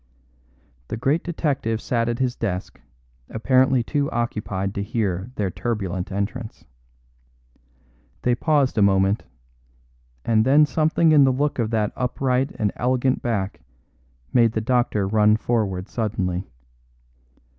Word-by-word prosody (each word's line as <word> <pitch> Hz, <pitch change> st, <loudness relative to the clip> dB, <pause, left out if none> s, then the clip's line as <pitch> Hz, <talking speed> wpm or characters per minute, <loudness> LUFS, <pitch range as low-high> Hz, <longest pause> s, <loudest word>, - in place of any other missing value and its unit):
The -, -, -4 dB
great 140 Hz, +8 st, +1 dB
detective 140 Hz, -10 st, -1 dB
sat 115 Hz, 0 st, -1 dB
at 120 Hz, -, -1 dB
his 125 Hz, -1 st, -1 dB
desk 95 Hz, -4 st, -4 dB, 0.5 s
apparently 130 Hz, +2 st, +2 dB
too 140 Hz, +3 st, -1 dB
occupied 105 Hz, -5 st, -2 dB
to 100 Hz, -, -3 dB
hear 100 Hz, -1 st, -2 dB
their 100 Hz, -3 st, -1 dB
turbulent 95 Hz, -6 st, -3 dB
entrance. 110 Hz, +4 st, -4 dB, 1.6 s
They 125 Hz, -, +3 dB
paused 140 Hz, -2 st, +1 dB
a -, -, +3 dB
moment, 95 Hz, +1 st, +2 dB, 1.0 s
and 110 Hz, -1 st, +3 dB
then 140 Hz, +5 st, +5 dB
something 155 Hz, +3 st, +2 dB
in 150 Hz, -2 st, +7 dB
the 135 Hz, -, +4 dB
look 140 Hz, +1 st, -1 dB
of 115 Hz, -2 st, 0 dB
that 110 Hz, -2 st, 0 dB
upright 130 Hz, +1 st, 0 dB
and 105 Hz, -2 st, 0 dB
elegant 130 Hz, +1 st, +1 dB
back 100 Hz, -5 st, -2 dB, 0.7 s
made 115 Hz, -2 st, +4 dB
the 110 Hz, -, 0 dB
doctor 110 Hz, -4 st, +1 dB
run 105 Hz, +1 st, +4 dB
forward 105 Hz, -6 st, -1 dB
suddenly. 95 Hz, -6 st, -2 dB
115 Hz, 125 wpm, -23 LUFS, 100-130 Hz, 1.6 s, in